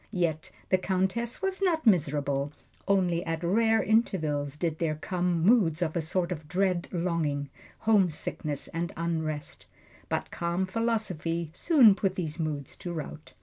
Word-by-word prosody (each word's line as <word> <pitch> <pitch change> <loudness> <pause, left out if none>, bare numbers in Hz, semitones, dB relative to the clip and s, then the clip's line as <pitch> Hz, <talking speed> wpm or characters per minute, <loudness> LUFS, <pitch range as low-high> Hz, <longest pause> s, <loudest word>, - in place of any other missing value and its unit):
Yet 170 -6 -1 0.2
the 185 - +3
Countess 190 - -1
was 385 0 -1
not 330 -6 +1
miserable 145 -7 +2 0.4
only 180 -3 +2
at 165 0 -3
rare 220 +5 +3
intervals 155 -10 +1
did 160 0 -2
there 160 -2 0
come 175 +1 -1
moods 180 -6 +4
of 160 -2 -2
a 170 - +1
sort 175 +3 -1
of 155 -3 -5
dread 180 +1 0
longing, 160 -6 -1 0.3
homesickness 175 -8 0
and 170 0 -3
unrest; 160 -3 -3 0.4
but - - -2
calm 170 +2 -1
philosophy 185 -7 -1
soon 260 - +6
put 195 -1 -1
these 165 -3 -3
moods 150 -4 -3
to 175 - -6
rout. 155 -2 -7
170 Hz, 145 wpm, -28 LUFS, 155-195 Hz, 0.4 s, soon